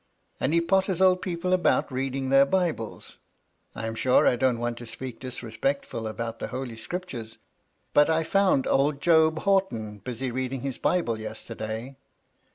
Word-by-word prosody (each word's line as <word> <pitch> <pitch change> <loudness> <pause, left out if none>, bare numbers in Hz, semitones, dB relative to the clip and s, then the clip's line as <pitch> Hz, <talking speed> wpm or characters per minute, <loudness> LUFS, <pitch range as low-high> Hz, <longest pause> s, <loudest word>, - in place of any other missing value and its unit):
And 135 - 0
he 170 +1 +3
potters 190 +1 +1
old 185 -1 +4
people 180 0 -1
about 180 -5 +2
read 130 +1 -2
ing 135 -1 -2
their 135 0 +6
Bibles. 170 - -2 0.6
I 110 - -4
am 115 - -3
sure 125 +3 +3
I - - +4
don't 125 -1 +2
want 120 0 -3
to 120 - -8
speak 130 +1 -6
dis 130 -1 -6
respectfully 115 -1 -2
about 115 +1 -5
the - - -3
Holy 125 -2 -5
Scriptures, 115 -3 -6 0.6
but 145 +1 +5
I 160 0 +2
found 190 -5 +2
old 140 +1 +2
Job 160 0 +4
Horton 120 - 0
busy 125 +2 -4
reading 130 +1 -3
his 135 -1 -4
Bible 120 -12 +1
yesterday. 110 +3 -6
130 Hz, 165 wpm, -26 LUFS, 115-165 Hz, 0.6 s, their